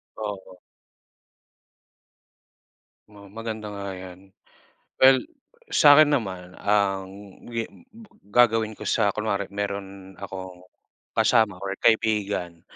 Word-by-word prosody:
Oo. 100 -4 -7 2.5
Oo 100 -2 -15
maganda 110 -1 -6
nga 100 -1 -6
yan. 95 +1 -12 0.7
Well 130 0 +8 0.5
sakin 150 - +6
naman, 95 -7 -4
ang 95 -2 0 1.2
gagawin 115 -2 +3
ko - - -7
sa 105 -3 +2
kunwari 100 -2 -2
meron 100 -1 -6
akong 95 -2 -8 0.6
kasama 110 -6 +3
or 100 0 -4
kaibigan 105 -7 +1
100 Hz, 85 wpm, -25 LUFS, 95-110 Hz, 2.5 s, Well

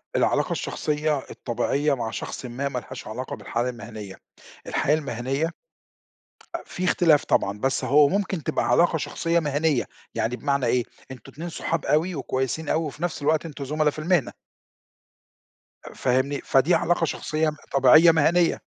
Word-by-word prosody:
العلاقة - - +2
الشخصية، 150 -1 -1
الطبيعية 140 +5 0
مع 120 -4 -3
شخصٍ 125 - -6
ما، 130 +4 -3
ما 130 -2 -3
لهاش 130 +1 -10
علاقة 125 +4 -5
بالحالة 120 +2 -2
المهنيّة، 110 -5 -8 0.5
الحياة 150 - +2
المهنيّة 135 +2 -2 1.1
في 180 - -6
اختلاف 165 -4 +4
طبعًا، 100 +1 +1
بس 135 +2 0
هو 145 +1 +5
ممكن 195 -4 -1
تبقى - - -1
علاقة 165 +6 +4
شخصية 165 +2 0
مهنيّة، 150 -2 +1 0.3
يعني 115 +2 -1
بمعنى 140 -1 0
إيه، 120 +1 +2 0.3
أنتم 125 -4 -11
اتنين 170 +4 -6
صحاب 165 -1 -3
أوي 160 +5 +1
وكويسين 130 +3 -2
أوي، 160 - +1
وفي 150 +3 -7
نفس 175 -3 -2
الوقت 155 +3 +1
أنتم 145 -3 -6
زملا 150 +2 +1
في 150 - -7
المهنة. 170 -3 +1 1.6
فاهمني؟ 130 +3 0
فدي 140 +6 +4
علاقة 170 0 +1
شخصية 155 0 -1 0.2
طبيعية 140 +5 +7
مهنيّة. 165 +2 +2
145 Hz, 145 wpm, -24 LUFS, 130-160 Hz, 1.6 s, طبيعية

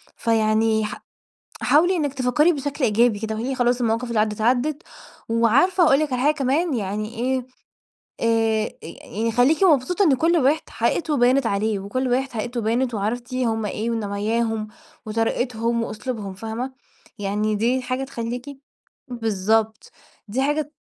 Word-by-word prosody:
فيعني 220 -1 +2
ح - - -7 0.6
حاولي 350 +5 +4
إنِك 290 -4 -1
تفكّري 265 +6 +2
بشكل 285 0 -4
إيجابي 225 -1 +3
كده 220 0 -3
وقولي 250 +5 -3
خلاص 245 0 +1
المواقف 230 +2 0
اللي 235 -2 0
عدّت، 215 0 0
عدّت، 260 +7 +1 0.5
وعارفة 240 - +3
أقول 280 -3 +5
لِك 300 -4 -1
على 250 - 0
حاجة 295 +2 +4
كمان، 290 +3 0
يعني 215 +1 -3
إيه 255 +2 -1 0.7
آآ، 225 -1 +1
يعني 220 +7 -4
خلّيكِ 265 - +3
مبسوطة 360 +4 +3
إن 295 -7 +4
كلّ 330 +6 +2
واحد 295 +1 +3
حقيقته 305 -4 0
بانت 250 +1 +3
عليه 205 0 0
وكلّ 230 +7 -2
واحد 260 +2 0
حقيقته 240 +1 -3
بانت 235 +3 0
وعرفتِ 230 +4 -3
هم 225 -4 0
إيه 215 +3 -3
ونواياهم 220 +1 -1 0.4
وطريقتهم 230 +1 -1
وأسلوبهم 215 -3 -5
فاهمة، 225 +6 -5 0.5
يعني 210 +2 -1
دي 240 +5 +1
حاجة 255 +1 -2
تخلّيكِ 245 -1 -5 0.6
بالضبط 220 -1 -1 0.4
دي 230 +6 -1
حاجة 295 +1 -1
235 Hz, 145 wpm, -22 LUFS, 220-265 Hz, 0.7 s, أقول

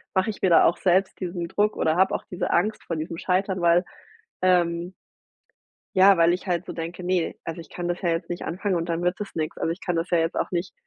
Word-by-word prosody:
mache 190 +4 +2
ich - - -13
mir 190 - +3
da 170 - +6
auch 170 - +3
selbst 190 +1 +1
diesen 175 -2 -4
Druck 210 +3 +1
oder 160 +1 +1
habe 190 +1 +3
auch - - -4
diese 180 - -2
Angst 210 +5 +1
vor 165 - -4
diesem 160 +2 -5
Scheitern, 190 0 0
weil, 170 +1 +4 0.6
ähm 175 -1 +2 1.0
ja, 195 +1 +7
weil 170 0 +4
ich 180 +3 -3
halt 175 -1 -1
so - - -5
denke: 170 +2 -6
„Ne? 180 -2 0
Also, 165 +1 -5
ich 165 - -12
kann 175 - -5
das 175 0 -2
ja 175 - 0
jetzt 165 +1 -2
nicht 175 - -4
anfangen 185 +2 -1
und 165 0 -2
dann 170 0 -1
wird 180 +1 +1
das 205 - -6
nix.“ 155 -1 -3
Also, 165 - 0
ich 170 - -9
kann 180 -2 -2
das 165 +2 -1
ja 175 - +3
jetzt 165 +1 0
auch - - -1
nicht 175 0 -2
175 Hz, 255 wpm, -25 LUFS, 170-185 Hz, 1.0 s, ja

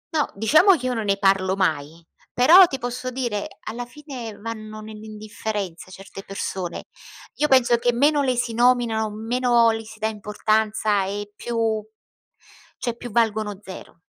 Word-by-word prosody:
No, 300 - +2
diciamo 310 - +5
che 255 - -7
io 250 - 0
non 225 -2 -3
ne 195 -1 +1
parlo 195 -1 +2
mai, 165 -3 -2 0.3
però, 340 +9 +8
ti 270 - -4
posso 250 +1 -4
dire, 240 -5 -3
alla 240 +2 -6
fine 250 -7 -9
vanno 215 0 -7
nell'indifferenza 215 -3 -6
certe 195 +1 -10
persone. 190 -3 -5 0.5
Io 300 - +2
penso 250 -3 +4
che 245 +1 +1
meno 290 +4 +3
le 255 -2 +1
si 240 -1 -2
nominano, 235 -2 +2
meno 235 +2 +2
le 225 0 -4
si 220 0 -13
dà 220 0 -1
importanza, 215 -1 0
e 205 +1 -5
più 235 +1 -5 1.2
cioè 240 -2 -3
più 245 - -8
valgono 215 -3 0
zero. 185 -3 -11
220 Hz, 155 wpm, -23 LUFS, 205-245 Hz, 1.2 s, però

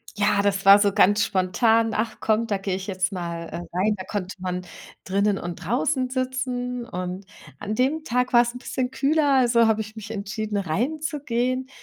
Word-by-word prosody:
Ja, 205 -1 +2
das 195 -1 0
war 200 +1 +9
so 200 -1 +2
ganz 205 0 +4
spontan. 225 +4 +2
Ach, 220 +1 -2
komm, 220 +1 +1
da 200 - 0
gehe 195 -1 -2
ich 190 +1 -6
jetzt 190 +1 -1
mal, 170 -2 -5
äh, - - -7 0.2
rein. 210 +3 +2
Da 185 - -6
konnte 195 -2 -4
man 180 0 -3 0.4
drinnen 200 +1 +1
und 175 -1 -5
draußen 255 - 0
sitzen 255 -2 -3
und 185 -3 -5 0.3
an 210 +1 -3
dem 280 +6 +1
Tag 250 -2 0
war's 240 0 +4
'n - - -4
bisschen 250 0 -3
kühler, 285 +2 +2
also, 235 -3 +4
habe 220 0 +2
ich 215 +1 -9
mich 220 -1 -8
entschieden, 210 0 -3
reinzugehen. 255 - -2
215 Hz, 185 wpm, -24 LUFS, 195-250 Hz, 0.4 s, war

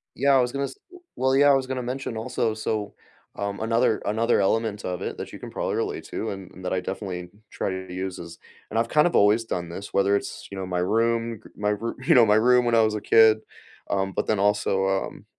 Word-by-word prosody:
Yeah. 140 +1 +3
I 130 - +5
was 125 0 0
gonna 140 +1 -1
s 135 - -8 0.4
well, 130 +1 +2
yeah, 145 +1 +6
I 140 - +7
was 135 -1 +1
gonna 130 -1 -3
mention 125 -1 -4
also. 115 -1 -1
So, 110 -1 -3 0.4
um 100 0 -4
another 115 0 +1
another 110 +3 +2
element 105 +1 0
of 90 -1 -3
it - - -4
that - - -7
you - - -8
can - - -9
probably - - -2
relate - - -3
to 110 - -4
and 95 -2 -7
and 95 - -12
that 90 - -3
I 95 - +1
definitely 90 -1 -5 0.2
try - - -2
to 95 -1 -6
use 95 0 -4
is 85 -1 -10 0.3
and 110 - 0
I've 115 - +1
kind 150 +6 +4
of 175 - -2
always 105 +3 +4
done 90 -6 -4
this, 95 +4 -8
whether 100 +1 +3
it's, 100 - -4
you 100 - -6
know, 95 - -3
my 90 -1 -2
room, 115 +3 0
k - - -14
my 105 0 0
roo 110 +3 -3
you - - +5
know, 120 -3 +7
my 105 -1 +4
room 125 +3 +5
when 120 -1 +2
I 115 - +6
was 110 -1 +1
a 105 - -3
kid, 110 +1 +5 0.5
um, 95 -1 -1
but - - -1
then 110 - 0
also, 100 -1 +1
um, 95 0 -2
110 Hz, 250 wpm, -25 LUFS, 95-115 Hz, 0.5 s, I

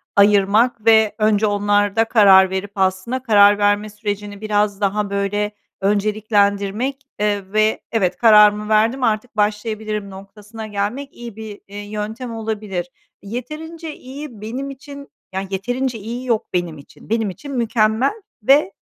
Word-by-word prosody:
ayırmak 205 +3 +3
ve 220 -2 +5
önce 215 -1 +2
onlarda 205 +1 +2
karar 195 -4 +6
verip 190 +1 -4
aslında 190 +6 -1
karar 205 -3 +6
verme 205 +1 +1
sürecini 205 -1 -5
biraz 210 -1 0
daha, 205 +1 0
böyle, 200 +1 -1 0.3
önceliklendirmek, 205 +3 0 0.2
eee, 205 -2 -1
ve 215 0 +2
"Evet, 185 -6 0
kararımı 210 -1 +5
verdim. 225 +5 +2
Artık 225 0 -1
başlayabilirim." 210 0 -2
noktasına 210 +3 -10
gelmek 215 +7 -3
iyi 235 -3 -9
bir, 215 -2 -9
eee, 200 +1 -10
yöntem 215 +4 -5
olabilir. 210 -5 -4 0.3
Yeterince 305 +9 -7
iyi 265 -4 -10
benim 250 +6 -5
için, 280 +1 -10 0.2
yani, 190 +1 -3
yeterince 245 +5 -2
iyi 235 +5 -6
yok 230 -4 0
benim 175 -3 -2
için. 140 - -16
Benim 225 -1 0
için 280 +10 -9
"mükemmel" 230 0 +1 0.3
ve 270 -3 +4
210 Hz, 135 wpm, -20 LUFS, 200-230 Hz, 0.3 s, karar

